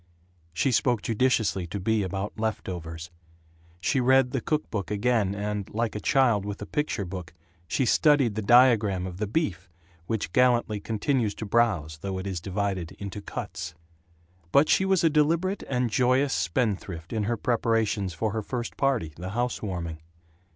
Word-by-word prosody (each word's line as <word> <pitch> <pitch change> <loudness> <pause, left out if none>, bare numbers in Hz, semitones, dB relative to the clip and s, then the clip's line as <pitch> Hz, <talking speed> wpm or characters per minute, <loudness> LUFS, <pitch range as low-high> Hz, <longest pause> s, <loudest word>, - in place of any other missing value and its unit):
She 130 - +1
spoke 120 -2 +2
judiciously 110 -6 +1
to 100 +4 -4
Bea 110 +3 +1
about 95 +2 -4
left 110 -1 -2
overs. 85 -1 -6 0.7
She 130 - +1
read 130 0 +4
the 135 - -1
cookbook 120 - -2
again 105 -2 +1
and, 105 -1 -3
like 115 0 0
a 105 - -4
child 120 -3 +3
with 100 0 -5
a 105 - -6
picture 150 -4 -2
book, 90 -3 -7 0.3
she 130 - 0
studied 140 -3 +4
the 110 - -2
diagram 110 -5 +4
of 90 -1 -6
the 105 +1 -2
beef 100 - -2 0.4
which 110 -6 -2
gallantly 120 -4 +3
continues 110 +1 -1
to 110 - -5
browse 95 -9 +1
though 95 +3 -4
it 95 - -5
is 95 -4 -3
divided 95 -2 -2
into 100 0 -7
cuts. 80 -4 -6 0.8
But 140 +8 +5
she 190 - +4
was 190 -2 +2
a 165 - +5
deliberate 165 +6 +2
and 125 -3 0
joyous 130 +3 +2
spendthrift 85 0 -2
in 110 -2 0
her 120 +2 0
preparations 110 -5 0
for 110 +5 -1
her 110 +1 -2
first 120 +2 -5
party, 125 - 0
the 90 +2 -5
housewarming. 95 -8 -3
105 Hz, 165 wpm, -27 LUFS, 95-125 Hz, 0.8 s, But